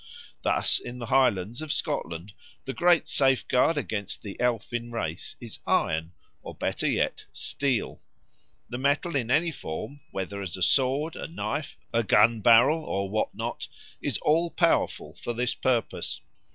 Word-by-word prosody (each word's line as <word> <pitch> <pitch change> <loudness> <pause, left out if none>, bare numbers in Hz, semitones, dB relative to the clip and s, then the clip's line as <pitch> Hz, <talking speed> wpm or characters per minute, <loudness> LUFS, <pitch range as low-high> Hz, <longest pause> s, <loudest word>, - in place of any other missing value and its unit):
Thus - - +2
in 120 - -8
the 120 - -5
Highlands 120 -2 +2
of 155 -2 -3
Scotland 85 - -2 0.3
the 135 - -3
great 175 0 +4
safeguard 135 +3 +3
against 110 -8 -3
the 100 -2 -6
elfin 120 0 -1
race 85 -8 -4
is - - -9
iron, 80 +2 +1 0.3
or, - - -8
better - - -1
yet, - - 0
steel. 135 -6 -2 0.7
The 120 - -5
metal 145 +5 +1
in 120 -4 0
any 160 +6 +3
form, 140 - -6
whether 100 +1 -4
as 95 -2 -5
a 95 - -1
sword, 135 - +2
a - - -5
knife, 160 -3 -4 0.2
a 115 - +3
gun 110 +1 +4
barrel, 120 +9 +6
or 100 -7 -2
what 110 - -1
not, - - -4 0.3
is - - 0
all 165 +3 +3
powerful 170 0 +1
for 120 - -5
this 125 +1 0
purpose. 125 -3 -1
120 Hz, 150 wpm, -27 LUFS, 105-145 Hz, 0.7 s, barrel